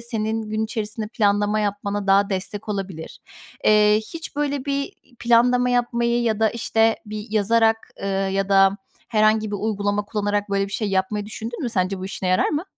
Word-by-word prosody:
senin 225 -1 -2
gün 215 0 -1
içerisinde 215 -1 -4
planlama 205 -1 +1
yapmana 205 -1 -2
daha 200 +1 +4
destek 200 +3 -4
olabilir. 195 -5 -5 0.4
Eee, 210 0 +5 0.2
hiç, 325 -3 -7
böyle, 285 -2 -1
bir 280 -1 -2 0.3
planlama 245 +1 +3
yapmayı 240 -1 +1
ya 220 -2 0
da, 220 -1 +3
işte, 225 -1 +1
bir 210 0 -6
yazarak, 225 +1 +3 0.3
ııı, 195 0 -1
ya 195 0 -1
da 195 0 +5 0.3
herhangi 215 -1 +2
bir 205 - -2
uygulama 205 0 -1
kullanarak, 205 -1 -2
böyle, 195 0 +1
bir 200 - -10
şey 215 0 -1
yapmayı 195 +2 -1
düşündün 225 +4 -6
mü? 245 - -1
Sence 190 -2 -1
bu 185 - -6
işine 190 -1 -4
yarar 185 - +3
mı? 305 +3 -2
215 Hz, 175 wpm, -22 LUFS, 200-230 Hz, 0.4 s, Eee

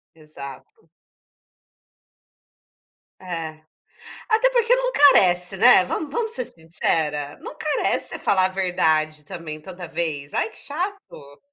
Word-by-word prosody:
Exato. 150 0 -12 2.3
É. 165 -4 -6 0.7
Até 450 +3 +4
porque 480 0 +3
não - - -1
carece, 185 - +5
né, 185 - +7
vamos 295 - -4
vamos 455 -1 -2
ser 250 - -1
sincera? 155 -3 -2
Não - - -9
carece 305 -1 0
você - - -6
falar 190 -2 +2
a - - +1
verdade 160 -5 0
também 160 -4 -7
toda 180 0 -9
vez. 155 -4 -4
Ai, - - 0
que 220 - -18
chato! 320 - -6
175 Hz, 120 wpm, -22 LUFS, -, 2.3 s, né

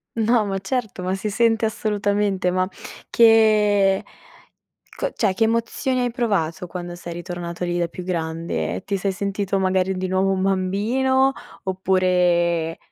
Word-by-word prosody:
No, 225 -1 +2
ma 195 -1 -2
certo, 215 -2 -3
ma 185 +1 -1
si 205 +2 -3
sente 225 0 +2
assolutamente, 205 -3 0
ma 185 0 +1 0.4
che, 210 -4 +4 0.9
co - - -2
cioè, 200 -4 0
che 225 - -2
emozioni 235 +3 0
hai 245 -1 -1
provato 190 -7 -1
quando 175 0 -6
sei 175 -1 -8
ritornato 175 0 -5
lì 175 0 -1
da 170 - 0
più 180 - -8
grande? 165 -2 -3
Ti 200 - -1
sei 195 +1 -1
sentito 200 +1 -2
magari 190 0 +1
di 185 0 -2
nuovo 190 +1 +1
un 190 -1 0
bambino, 225 +8 +1 0.3
oppure 180 -3 +1
195 Hz, 145 wpm, -22 LUFS, 180-215 Hz, 0.9 s, che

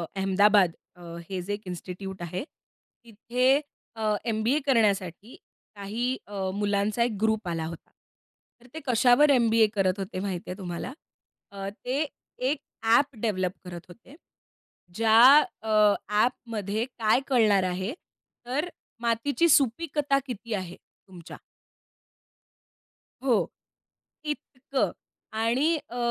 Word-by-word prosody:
अहमदाबाद 195 -1 +4 0.2
अ, 180 - -17 0.3
हे 190 -2 -3
जे 195 +3 -4
एक 205 - -5
इन्स्टिट्यूट 180 +1 -7
आहे 175 +6 -4
तिथे 250 -1 -2 0.4
अ, 215 -1 0
एमबीए 230 +5 +1
करण्यासाठी 210 - +1 0.4
काही 230 +6 -2
अ, 195 -2 -3
मुलांचा 205 +2 0
एक 235 - 0
ग्रुप 220 -2 +1
आला 165 -1 -2
होता. 165 0 -9 0.7
तर 245 - -18
ते 320 - -5
कशावर 250 +3 +5
एमबीए 230 -4 +4
करत 195 -2 +1
होते 190 -1 -4
माहिती 185 -3 -4
आहे 180 - -5
तुम्हाला? 180 +6 -5 0.6
अ, 195 -1 -5
ते 255 +8 -2 0.4
एक 295 - -1 0.2
ॲप 240 +5 +3
डेव्हलप 185 -5 0
करत 175 -1 -8
होते 230 +10 -15 0.8
ज्या 225 +1 +4 0.4
अ, 220 - -6 0.4
ॲपमध्ये 215 -1 -1
काय 220 +2 +3
कळणार 215 -7 +4
आहे? 185 +6 -2 0.5
तर 285 +8 -2 0.3
मातीची 240 +8 +1
सुपीकता 280 +1 +2
किती 235 -3 -6
आहे, 185 -3 -4 0.3
तुमच्या? 175 -3 -11 1.9
हो. 250 -5 +3 0.8
इतकं. 275 -2 -2 0.4
आणि 240 +9 +2
अ, 245 - -7
220 Hz, 115 wpm, -27 LUFS, 195-250 Hz, 1.9 s, कशावर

